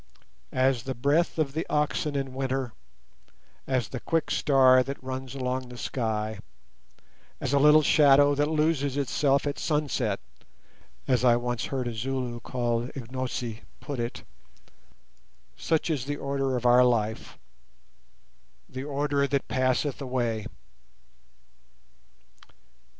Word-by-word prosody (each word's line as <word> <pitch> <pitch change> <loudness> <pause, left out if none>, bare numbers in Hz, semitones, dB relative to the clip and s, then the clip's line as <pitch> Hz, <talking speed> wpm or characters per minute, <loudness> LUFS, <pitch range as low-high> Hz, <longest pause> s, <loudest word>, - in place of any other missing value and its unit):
"As 130 -1 +2
the 130 +2 -5
breath 145 +9 +1
of 150 -4 0
the 160 +2 -1
oxen 150 0 0
in 135 -2 -2
winter, 130 -2 -2 0.9
as 130 -5 0
the 125 - -5
quick 165 +4 -1
star 130 -2 +5
that 135 +1 -5
runs 130 0 -5
along 130 -1 -3
the 125 - -10
sky, 110 -4 -2 1.0
as 135 - -2
a 140 - +4
little 150 +2 +6
shadow 145 -1 +5
that 145 +1 +1
loses 150 -3 +1
itself 140 0 +1
at 145 -1 -3
sunset," 140 -9 -1 0.9
as 125 -2 +2
I 120 -2 +6
once 120 -1 -2
heard 130 -3 -3
a 120 - -3
Zulu 125 +1 -3
called 120 0 -2
Ignosi 125 -2 -4 0.2
put 135 0 -6
it, 120 0 -4 1.3
such 165 0 0
is 135 -5 -2
the 145 +1 -3
order 135 -2 -1
of 125 - -5
our 125 +1 +6
life, 110 -3 0 1.3
the 130 +1 -6
order 140 0 0
that 140 -1 -1
passeth 130 +2 0
away. 120 -5 -2
130 Hz, 125 wpm, -27 LUFS, 125-140 Hz, 1.3 s, little